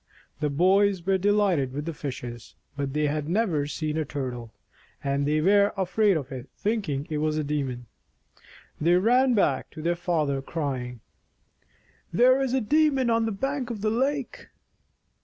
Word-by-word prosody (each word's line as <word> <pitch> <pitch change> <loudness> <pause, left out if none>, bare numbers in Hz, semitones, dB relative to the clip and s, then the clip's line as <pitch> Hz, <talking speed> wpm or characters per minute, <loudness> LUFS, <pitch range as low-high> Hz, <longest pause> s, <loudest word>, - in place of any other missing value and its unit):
The 150 - 0
boys 185 +4 +3
were 190 0 +2
de 205 +3 +2
lighted 180 -11 +1
with 145 +2 -4
the 165 - -3
fishes, 120 -5 -7 0.2
but 140 -2 -3
they 150 0 +1
had 150 +1 -2
never 175 -7 +1
seen 155 +1 -3
a 160 - +1
Tur 135 -3 -4
tle, 120 -2 -9 0.5
and 140 0 0
they 155 +1 +2
were 200 +4 +4
afraid 195 0 +2
of 140 -3 -6
it, 130 0 -7
thinking 200 -11 -1
it 150 - -1
was 155 0 0
a 155 - 0
demon. 135 -4 -3 0.9
They 170 +3 +3
ran 245 +6 +4
back 140 -10 +1
to 155 - -9
their 170 +1 +2
father, 155 -6 -1
crying, 130 -6 -4 1.1
"There 255 +9 +4
is 265 -1 0
a 265 - +1
demon 275 0 +2
on 230 0 +2
the - - -1
bank 270 +4 -2
of 225 -4 -5
the 215 0 +1
lake." 270 +3 -2
165 Hz, 175 wpm, -26 LUFS, 140-215 Hz, 1.1 s, were